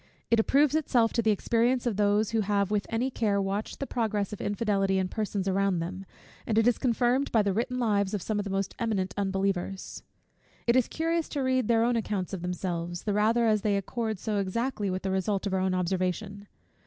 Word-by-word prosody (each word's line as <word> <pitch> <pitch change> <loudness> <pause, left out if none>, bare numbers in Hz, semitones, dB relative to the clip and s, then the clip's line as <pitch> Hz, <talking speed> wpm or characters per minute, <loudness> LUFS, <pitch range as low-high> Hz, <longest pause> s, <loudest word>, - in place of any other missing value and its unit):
It 230 - +5
approves 280 +5 +3
itself 250 -7 +2
to 235 - +2
the 220 - +1
experience 235 +4 +1
of 235 -4 0
those 205 +1 +2
who 225 -1 +1
have 200 -1 0
with 205 -2 0
any 240 +4 -1
care 205 -4 +1
watched 200 +2 -3
the 275 - -2
progress 215 -6 -1
of 210 - -6
infidelity 200 -2 0
in 185 -1 0
persons 205 -2 -2
around 195 -1 +1
them; 185 +3 -5 0.4
and 220 - 0
it 225 +1 +4
is 245 - +3
confirmed 250 +2 +1
by 220 -3 +4
the 200 -1 0
written 245 +4 -1
lives 205 -4 +1
of 200 - -3
some 215 -1 -1
of - - -1
the 200 - -5
most 195 0 -2
eminent 195 -5 -1
unbelievers. 195 -1 -2 0.6
It 235 - +3
is 255 -2 +3
curious 330 0 -1
to 285 - -2
read 260 -3 +1
their 230 -1 +3
own 240 +1 +2
accounts 205 -4 -2
of 190 - -4
themselves, 175 -1 -3
the 210 - -1
rather 225 +3 +3
as 215 -2 +3
they 205 -1 +1
accord 220 +2 -3
so 210 +2 -2
exactly 205 +2 -1
with 185 0 -3
the 190 - -1
result 190 +1 -1
of 200 - -2
our 190 - +2
own 185 0 +1
observation. 185 +3 -2
205 Hz, 215 wpm, -28 LUFS, 195-230 Hz, 0.6 s, It